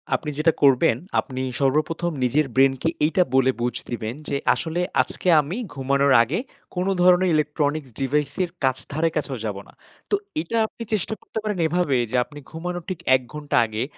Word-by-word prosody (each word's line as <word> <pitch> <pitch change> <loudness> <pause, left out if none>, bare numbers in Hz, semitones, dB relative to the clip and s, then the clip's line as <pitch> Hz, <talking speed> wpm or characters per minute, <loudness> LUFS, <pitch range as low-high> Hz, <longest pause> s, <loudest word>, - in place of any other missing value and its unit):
আপনি 150 - -3
যেটা 155 +1 +3
করবেন, 130 -4 +5 0.2
আপনি 130 -2 -4 0.2
সর্বপ্রথম 155 +5 +1
নিজের 145 +5 +2
ব্রেইন 135 0 +5
কে 165 - +2 0.2
এইটা 170 +4 +3
বলে 130 0 +4
বুঝ 120 0 -1
দিবেন, 115 -2 -3 0.2
যে 140 - -1 0.2
আসলে 170 +2 -2 0.2
আজকে - - -5
আমি 155 +8 -5 0.2
ঘুমানোর 140 0 +2
আগে 140 - -2 0.4
কোন 180 0 0 0.2
ধরনের 180 +1 +5
ইলেকট্রনিক্স 150 -1 0
ডিভাইস 140 +2 0
এর 175 - -4
কাছ 130 -1 +2
ধারে 160 +3 +1
কাছেও 145 -3 -2
যাব 105 -2 -3
না। - - -18 0.4
তো - - +3 0.3
এটা 230 - -3
আপনি 230 - -9
চেষ্টা 215 +1 0
করতে - - -9
পারেন 210 -2 -2
এভাবে; 160 -5 +1
যে - - -2
আপনি 145 -1 -12
ঘুমানোর 175 +2 -5
ঠিক 185 -3 -4 0.2
১ 130 - +1
ঘন্টা 150 -1 -3
আগে, 110 +1 -3
150 Hz, 180 wpm, -23 LUFS, 135-175 Hz, 0.4 s, করবেন